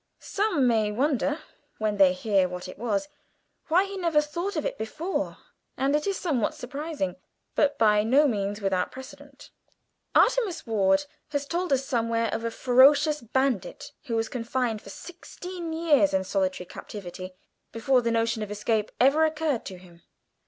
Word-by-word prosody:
Some 390 -10 0
may 220 -3 +2
wonder, 285 +5 0 0.4
when 215 -1 -1
they 190 -2 +6
hear 190 -1 +1
what 180 +1 -6
it 185 - -10
was, 225 +2 -1 0.6
why 350 +4 +4
he 395 0 -7
never 335 -5 +2
thought 340 +7 -3
of 310 - -2
it - - -3
before, 315 - -3 0.4
and 275 +2 +1
it 300 +3 0
is 395 - 0
somewhat 280 - -1
surprising, 275 - -4 0.4
but 285 -1 +2
by 210 -2 +4
no 265 +7 +4
means 205 -3 -2
without 190 -2 0
precedent. 265 +2 -12 0.6
Artemus 465 -8 +3
Ward 200 +1 +2 0.2
has 285 -1 -2
told 350 +3 -2
us 270 0 +2
somewhere 230 -3 0
of 225 - -3
a 230 - -1
ferocious 280 +5 +4
bandit 250 -3 -1
who 235 -4 -2
was 225 0 0
confined 235 -2 -2
for - - -12
sixteen 355 - -8
years 310 -6 +3
in 190 - +1
solitary 190 -1 -1
captivity, 185 -1 -9 0.4
before 250 +3 +2
the 235 - 0
notion 230 -1 0
of 210 - -4
escape 210 +1 -1
ever 275 +5 +5
occurred 310 -5 0
to 185 - -7
him. 175 -1 -17
245 Hz, 160 wpm, -26 LUFS, 210-300 Hz, 0.6 s, they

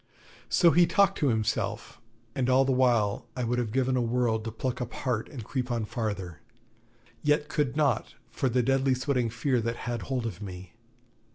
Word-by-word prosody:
So 170 -2 +5
he 175 +1 +5
talked 195 -1 +3
to 145 - +2
himself, 110 -4 -1 0.3
and 130 -3 0
all 130 +1 +5
the 135 - +1
while 120 -4 +2
I 125 - -1
would 120 +1 0
have 115 -3 -2
given 130 +1 +1
a 125 - +2
world 115 -2 0
to 115 - -3
pluck 125 +3 -3
up 120 - -4
heart 120 -4 -2
and 130 -7 -7
creep 125 +3 -3
on 115 -3 -1
farther; 100 -7 -4 0.8
yet 150 0 +1
could 145 -3 -1
not, 140 -7 +1 0.2
for 130 - 0
the 125 +1 +2
deadly 135 +1 +2
sweating 125 -2 0
fear 125 +2 0
that 115 +1 -2
had 120 -1 -2
hold 130 -3 -2
of 105 -4 -5
me. 90 -2 -8
125 Hz, 190 wpm, -28 LUFS, 115-135 Hz, 0.8 s, So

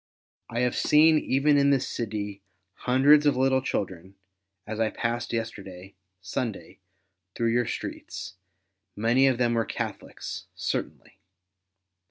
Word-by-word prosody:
I 120 - -2
have 125 -1 +1
seen 155 +1 +5
even 145 +2 +3
in 140 0 +4
this 135 -2 +2
city 105 -3 -4 0.3
hundreds 145 +6 +4
of 140 -3 +3
little 130 0 +3
children, 95 -6 -4 0.5
as 110 +1 -5
I 110 -1 +2
passed 115 +1 -3
yesterday, 100 -5 -5 0.3
Sunday, 110 0 -5 0.6
through 115 -1 +1
your 120 0 +1
streets; 95 - -6 0.6
many 120 +6 +3
of 130 -2 +2
them 120 -1 +2
were 115 -1 +2
Catholics, - - -6
certainly. - - -4
120 Hz, 125 wpm, -26 LUFS, 105-135 Hz, 0.6 s, seen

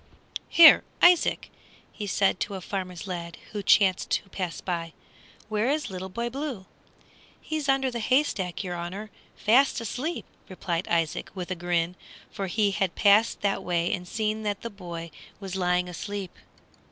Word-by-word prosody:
"Here, 330 -2 +9 0.2
Isaac," 350 -1 +4 0.4
he 210 - -6
said 195 -1 +2
to 205 - -3
a - - -4
farmer's 185 -1 -5
lad 170 -3 -5
who 210 - -3
chanced 190 -1 +3
to - - -1
pass 180 -4 -4
by, 170 -3 -4 0.5
"where 215 +3 0
is 295 -6 -1
Little 190 0 -5
Boy 235 +5 -3
Blue?" 260 -5 -5 0.7
"He's 310 -3 -3
under 270 -1 +2
the 240 - -4
hay 255 +6 +3
stack, 185 - -4
your 180 -2 -4
honor, 180 +5 -6 0.2
fast 255 +6 +3
asleep!" 255 - -4 0.2
replied 180 -2 -3
Isaac 165 -2 0
with 185 -1 -5
a - - 0
grin, 175 0 -1 0.4
for 195 -1 -4
he 205 +2 +1
had 195 -2 -1
passed 210 +2 +4
that 200 -1 0
way 175 -1 0
and 180 -1 -4
seen 215 +1 -1
that 205 -2 -2
the 230 - -5
boy 170 -4 -7 0.3
was 190 -2 -6
lying 180 -1 +1
asleep. 195 +2 -6
195 Hz, 165 wpm, -27 LUFS, 180-220 Hz, 0.7 s, Here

